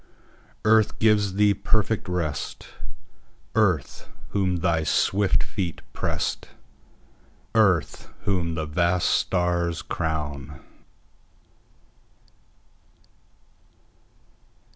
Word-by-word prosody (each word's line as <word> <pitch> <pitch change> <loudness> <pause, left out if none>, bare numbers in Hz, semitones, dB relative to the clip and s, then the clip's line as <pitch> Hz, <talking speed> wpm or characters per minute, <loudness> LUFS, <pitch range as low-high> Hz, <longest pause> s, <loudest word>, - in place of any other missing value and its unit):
Earth 110 -1 +4
gives 105 -3 +3
thee 105 0 +4
perfect 100 +1 0
rest:Earth, 90 +2 -3 0.2
whom 95 -3 0
thy 85 -2 +1
swift 95 +6 +2
feet 90 -5 -4
pressed:Earth, 90 -10 -3
whom 90 -5 0
the 80 -1 -2
vast 85 +3 +1
stars 85 -3 0
crown. 75 -5 -4
90 Hz, 60 wpm, -25 LUFS, 80-100 Hz, 0.2 s, Earth